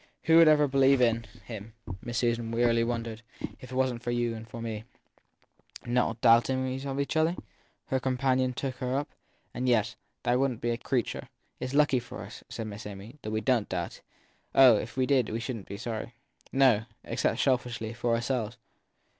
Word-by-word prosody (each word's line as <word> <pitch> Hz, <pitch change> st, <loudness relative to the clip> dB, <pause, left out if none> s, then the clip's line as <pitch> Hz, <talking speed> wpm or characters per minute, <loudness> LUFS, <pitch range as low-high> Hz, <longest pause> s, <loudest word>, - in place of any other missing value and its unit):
Who 165 Hz, 0 st, +5 dB
would 165 Hz, -1 st, +8 dB
ever 150 Hz, -1 st, +6 dB
believe 135 Hz, 0 st, +4 dB
in 115 Hz, -2 st, +2 dB, 0.2 s
him? 110 Hz, -1 st, -8 dB, 0.3 s
Miss 120 Hz, 0 st, -4 dB
Susan 120 Hz, -1 st, 0 dB
wearily 115 Hz, 0 st, +3 dB
wondered. 115 Hz, -1 st, -3 dB, 0.4 s
If 130 Hz, -, -11 dB
it -, -, -5 dB
wasn 130 Hz, -2 st, +1 dB
t -, -, -25 dB
for -, -, -3 dB
you 120 Hz, -1 st, 0 dB
and 115 Hz, +1 st, -8 dB
for 115 Hz, -, -7 dB
me 110 Hz, -2 st, -4 dB, 1.0 s
Not 120 Hz, -2 st, +1 dB
doubting 130 Hz, +2 st, +3 dB
of 135 Hz, 0 st, -3 dB
each 140 Hz, +2 st, -1 dB
other? 160 Hz, +2 st, +3 dB, 0.5 s
her 130 Hz, -, 0 dB
companion 130 Hz, 0 st, +1 dB
took 130 Hz, 0 st, -4 dB
her 130 Hz, +1 st, 0 dB
up: 145 Hz, -, -2 dB, 0.4 s
yes, 120 Hz, -3 st, +1 dB, 0.3 s
there 120 Hz, +1 st, +2 dB
wouldn 135 Hz, -3 st, +1 dB
t -, -, -21 dB
be 120 Hz, -, 0 dB
a 115 Hz, -, -1 dB
creature. 125 Hz, -4 st, -2 dB, 0.3 s
It -, -, -3 dB
s 130 Hz, -, -5 dB
lucky 145 Hz, -3 st, +4 dB
for 120 Hz, -, -8 dB
us, -, -, -10 dB
said 115 Hz, -, -5 dB
Miss 105 Hz, 0 st, -7 dB
Amy, 105 Hz, +7 st, -10 dB
that 110 Hz, -, -5 dB
we 110 Hz, 0 st, -1 dB
don 120 Hz, -2 st, +2 dB
t -, -, -5 dB
doubt. 85 Hz, -1 st, -4 dB, 0.5 s
Oh, 130 Hz, -4 st, +9 dB
if 110 Hz, +3 st, -7 dB
we 130 Hz, -, +3 dB
did 130 Hz, -4 st, +2 dB
we 110 Hz, -, -2 dB
shouldn 115 Hz, -3 st, -5 dB
t -, -, -8 dB
be -, -, -7 dB
sorry. 115 Hz, +1 st, -5 dB, 0.4 s
No 130 Hz, -5 st, +4 dB, 0.2 s
except, -, -, -1 dB
selfishly, 120 Hz, -4 st, 0 dB
for 120 Hz, 0 st, 0 dB
ourselves. 120 Hz, -1 st, -2 dB
120 Hz, 195 wpm, -29 LUFS, 115-130 Hz, 1.0 s, Oh